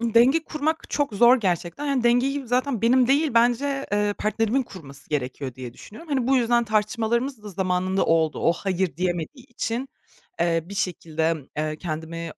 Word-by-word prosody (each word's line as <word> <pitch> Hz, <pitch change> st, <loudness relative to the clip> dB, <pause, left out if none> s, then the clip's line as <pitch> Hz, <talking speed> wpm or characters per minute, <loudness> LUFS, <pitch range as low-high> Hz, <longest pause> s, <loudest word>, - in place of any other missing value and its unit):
Denge 240 Hz, +7 st, +4 dB
kurmak 310 Hz, +1 st, -2 dB
çok 290 Hz, -6 st, 0 dB
zor 240 Hz, +4 st, +6 dB
gerçekten. 180 Hz, -, -2 dB
Yani, 275 Hz, -4 st, 0 dB
dengeyi 255 Hz, +3 st, +2 dB
zaten 250 Hz, -1 st, 0 dB
benim 250 Hz, +1 st, +4 dB
değil, 285 Hz, +3 st, +3 dB
bence, 270 Hz, +4 st, +2 dB
ııı, 205 Hz, 0 st, +1 dB
partnerimin 225 Hz, +4 st, 0 dB
kurması 145 Hz, -, -12 dB
gerekiyor 130 Hz, -2 st, -3 dB
diye 125 Hz, -1 st, -8 dB
düşünüyorum. 220 Hz, -, -13 dB
Hani, 260 Hz, -3 st, 0 dB
bu 270 Hz, +1 st, +4 dB
yüzden 240 Hz, -1 st, +2 dB
tartışmalarımız 225 Hz, +3 st, 0 dB
da 210 Hz, -, -8 dB
zamanında 185 Hz, 0 st, 0 dB
oldu. 160 Hz, -1 st, +2 dB
O, 170 Hz, -, +3 dB
"Hayır!" 185 Hz, -4 st, -2 dB
diyemediği 180 Hz, -, -3 dB
için, 240 Hz, +1 st, -3 dB, 0.5 s
eee, 165 Hz, -1 st, +2 dB
bir 200 Hz, -, -8 dB
şekilde, 165 Hz, -4 st, -1 dB, 0.2 s
eee, 155 Hz, 0 st, -2 dB
kendimi 165 Hz, 0 st, -5 dB
215 Hz, 160 wpm, -24 LUFS, 170-255 Hz, 0.5 s, zor